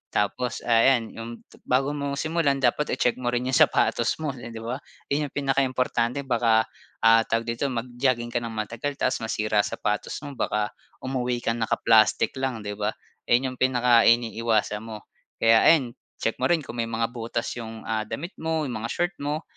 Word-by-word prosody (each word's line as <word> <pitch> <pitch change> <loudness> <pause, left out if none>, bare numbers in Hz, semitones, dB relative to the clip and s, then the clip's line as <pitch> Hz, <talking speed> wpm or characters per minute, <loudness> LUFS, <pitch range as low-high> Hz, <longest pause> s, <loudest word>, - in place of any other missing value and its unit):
tapos, 105 +4 -1
ah, 115 -1 +3 0.2
yan 115 -2 -4
yung 115 0 -7 0.4
bago 135 +3 +2
mo 140 -1 -3
simulan 155 -1 +1
dapat 135 +2 +1
i-check 125 +1 +1
mo 125 - -4
rin 125 +1 0
yung 130 - +3
sapatos - - +3
mo, 155 -3 -3
eh, 125 -2 -9
'di 115 -1 -8
ba? 120 +4 -3 0.3
Yun 150 +1 +1
ang - - -19
pinakaimportante 135 -2 0
baka, 115 -3 +3 0.4
ah, 115 0 +7
tawag 115 0 0
dito 115 +4 -2
mag-jogging 120 -1 -1
ka 120 - 0
ng 115 -1 -6
matagal 115 +6 -3
tapos 130 -2 0
masira 110 -2 0
sapatos 105 0 -1
mo 145 - -6
baka 105 -5 -1 0.3
umuwi 125 -2 -2
kang 115 0 -1
naka-plastic 110 0 +3
lang, 130 -5 -2
'di 105 0 -6
ba? 105 +1 -1 0.3
Ayun 130 +2 +2
yung 130 - -11
pinakainiiwasan 115 -3 +3
mo. 110 -2 -8 0.3
Kaya 115 0 +5
ayan 140 -7 +5 0.3
check 115 - -1
mo - - +2
rin 170 -3 +2
kung 120 - -7
may 115 - 0
mga 115 0 -1
butas 115 -1 -3
yung, 110 -1 -8
ah, 110 -1 -2
damit 160 - -5
mo 160 -1 -1
yung 125 -6 -4
mga 115 - -3
short 175 +8 -1
mo, 150 +3 -2
120 Hz, 185 wpm, -25 LUFS, 115-135 Hz, 0.4 s, ah